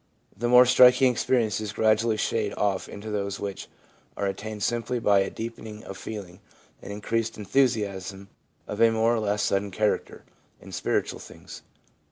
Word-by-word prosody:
The 120 +3 -2
more 125 +1 +8
striking 125 +1 +6
experiences 110 -4 0
gradually 110 +1 +2
shade 105 -1 -1
off 100 -2 -1
into 105 +2 -7
those 100 -1 -3
which 100 -2 -5 0.5
are 100 - -1
attended 105 +2 -4
simply 120 +1 -1
by 105 -4 +3
a 95 - 0
deepening 110 -1 -8
of 95 - -8
feeling 95 -4 -8 0.4
and 100 - -8
increased 115 +2 -2
enthusiasm, 100 -5 -1 0.4
of 105 - -4
a 115 - +7
more 115 +1 +2
or 115 - 0
less 105 -1 0
sudden 100 +1 0
character, 105 +2 -1 0.4
in - - -13
spiritual - - -1
things. - - -12
110 Hz, 155 wpm, -26 LUFS, 100-115 Hz, 0.5 s, more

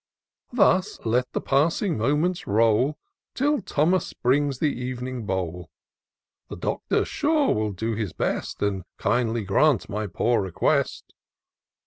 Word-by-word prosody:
Thus 210 -4 +2
let 125 +3 +1
the - - -1
passing 160 +6 +1
moments 150 +10 0
roll, 115 +7 +3 0.4
Till 290 +2 +1
Thomas 170 +6 +1
brings 140 +1 +1
the 130 -3 -1
ev'ning 125 -3 -5
bowl; 90 -3 -3 0.8
The - - -6
Doctor, - - -1
sure, 300 -2 +1
will 105 -1 -1
do 110 +4 -3
his 105 -4 -3
best. - - -3
And 100 -2 -1
kindly 120 -2 0
grant 110 +6 +2
my 105 0 -3
poor 115 +6 +1
request." 95 -3 -1
125 Hz, 125 wpm, -25 LUFS, 105-155 Hz, 0.8 s, roll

